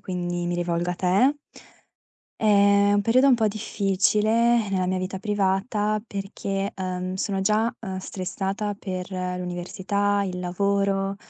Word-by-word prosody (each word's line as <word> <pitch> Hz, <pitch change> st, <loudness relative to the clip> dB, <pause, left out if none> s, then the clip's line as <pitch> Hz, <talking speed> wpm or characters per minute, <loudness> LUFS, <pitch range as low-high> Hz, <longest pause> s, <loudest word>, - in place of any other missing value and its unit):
quindi 175 Hz, -1 st, -3 dB
mi 175 Hz, -, -1 dB
rivolgo 175 Hz, 0 st, -1 dB
a -, -, -2 dB
te. 200 Hz, +12 st, +2 dB, 1.0 s
È 200 Hz, -1 st, +4 dB
un 205 Hz, -, +3 dB
periodo 250 Hz, +6 st, +4 dB
un 265 Hz, -, +6 dB
po' 225 Hz, -2 st, +2 dB
difficile 215 Hz, +2 st, +1 dB
nella 185 Hz, -1 st, 0 dB
mia 185 Hz, 0 st, 0 dB
vita 185 Hz, +1 st, -4 dB
privata 205 Hz, +1 st, 0 dB
perché, 195 Hz, -1 st, -3 dB
ehm, 185 Hz, -1 st, -3 dB
sono 195 Hz, +1 st, -2 dB
già, 215 Hz, +4 st, +1 dB
uhm, 190 Hz, -4 st, -5 dB
stressata 195 Hz, +3 st, -3 dB
per 185 Hz, -2 st, -5 dB
l'università, 185 Hz, +2 st, -2 dB
il 185 Hz, -2 st, -3 dB
lavoro, 195 Hz, +2 st, 0 dB
195 Hz, 135 wpm, -24 LUFS, 185-210 Hz, 1.0 s, un